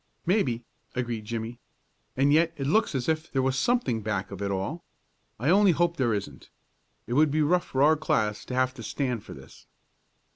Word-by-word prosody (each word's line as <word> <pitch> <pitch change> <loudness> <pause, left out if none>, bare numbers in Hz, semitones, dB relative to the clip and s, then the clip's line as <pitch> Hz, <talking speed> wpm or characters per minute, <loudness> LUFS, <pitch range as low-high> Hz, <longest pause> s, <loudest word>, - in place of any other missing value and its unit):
"Maybe," 135 - +1 0.3
agreed 120 -3 -3
Jimmie. 115 +2 -5 0.6
"And 140 +2 +4
yet 165 +1 +3
it 135 - -3
looks 215 +3 +2
as 130 - -2
if 160 0 -1
there 135 -2 +1
was 130 0 +1
something 185 - +1
back 100 -3 -3
of 100 0 -7
it 100 - -1
all. 100 - -3 0.6
I 140 +8 +2
only 195 -1 +5
hope 170 +1 +1
there 125 -4 +1
isn't. 85 -10 -7 0.6
It 120 - -4
would 150 +3 +4
be 155 +2 +1
tough 180 +2 +2
for 135 +1 +1
our 155 +2 +6
class 105 -8 0
to 125 - -5
have 130 0 +1
to 120 - -10
stand 125 -1 -2
for - - -10
this." - - -15
130 Hz, 195 wpm, -27 LUFS, 115-160 Hz, 0.6 s, our